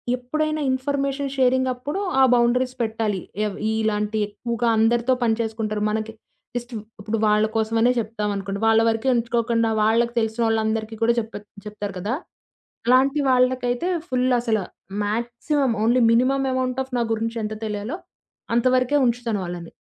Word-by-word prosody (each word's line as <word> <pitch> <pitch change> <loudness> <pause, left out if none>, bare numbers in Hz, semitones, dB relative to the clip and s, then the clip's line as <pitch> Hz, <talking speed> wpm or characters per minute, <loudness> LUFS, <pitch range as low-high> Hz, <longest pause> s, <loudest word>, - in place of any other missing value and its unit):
ఎప్పుడైనా 310 +5 -2
ఇన్ఫర్మేషన్ 275 +1 -1
షేరింగప్పుడు 260 +4 +1 0.2
ఆ - - +7
బౌండరీస్ 250 +1 +2
పెట్టాలి. 220 -3 -1 0.3
ఏవ్ 205 - -3
ఇలాంటివి 215 -1 0
ఎక్కువగా 235 +3 -3
అందరితో 235 +3 +3
పనిచేసుకుంటారు 220 -2 -1
మనకి 220 +1 -3 0.4
జస్ట్ 240 0 -5 0.3
ఇప్పుడు 215 +2 -2
వాళ్ళ 210 +1 +4
కోసమనే 225 +2 +2
జెప్తామనుకోండి, 205 -3 -3
వాళ్ళ 225 0 +5
వరకే 225 +3 -1
ఉంచుకోకుండా 230 -1 +1
వాళ్ళకి 230 +2 +2
తెలిసినోళ్ళందరికి 220 -1 0
కూడా 230 +1 +4
చెప 225 0 -6 0.3
చెప్తారు 205 -2 -6
కదా! 205 +6 -2 0.7
అలాంటి 270 +4 +4
వాళ్ళకైతే 255 +3 +2 0.2
ఫుల్ 255 0 +1
అసల 225 -3 0 0.5
maximum 240 +5 -1
only 240 +3 +3
minimum 265 +3 +2
amount 255 0 -1
of 260 -1 -16
నా 235 - +2
గురించి 230 +1 -2
ఎంత 215 +1 -3
తెలియాలో 210 - -4 0.6
అంత 235 - +2
వరకే 255 +3 +2
ఉంచుతాను 235 -3 0
వాళ్ళని. 175 -1 -7
235 Hz, 130 wpm, -23 LUFS, 220-255 Hz, 0.7 s, ఆ